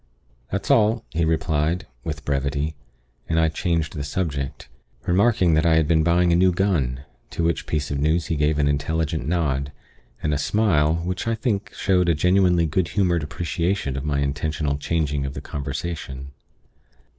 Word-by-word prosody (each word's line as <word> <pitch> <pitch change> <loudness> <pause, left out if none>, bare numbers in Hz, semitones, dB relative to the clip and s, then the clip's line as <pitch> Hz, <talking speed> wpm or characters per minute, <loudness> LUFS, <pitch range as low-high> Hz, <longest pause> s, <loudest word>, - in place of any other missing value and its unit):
"That's 100 +1 -1
all," 110 +1 +3
he 85 0 0
replied, 80 +2 0 0.2
with 75 -1 -5
brevity; 70 +2 -1 0.6
and 80 - +2
I 80 0 +3
changed 80 -1 -1
the 70 - -3
subject, 70 -5 -3 0.4
remarking 95 -2 +3
that 80 +1 +3
I 85 -1 +4
had 80 -2 +3
been 80 -1 +3
buying 85 +1 +3
a - - +4
new 90 +1 +4
gun, 85 -9 0 0.3
to 85 - -3
which 85 0 0
piece 75 -2 -2
of 70 - -1
news 80 +3 +1
he 80 - -1
gave 75 0 +1
an 75 -1 +2
intelligent 75 0 -1
nod, 70 -5 0 0.5
and 75 - +1
a 70 - 0
smile 80 -5 +2
which 90 +5 -3
I 115 - +1
think 110 -4 -2
showed 90 -3 +2
a 85 - +3
genuinely 90 +1 +3
good 80 +3 0
humored 90 -4 +1
appreciation 85 +1 -2
of 70 - -3
my 70 -1 0
intentional 75 +1 -1
changing 75 -3 -1
of 70 0 -4
the - - -4
conversation. 70 -1 -5
80 Hz, 170 wpm, -23 LUFS, 75-90 Hz, 0.6 s, I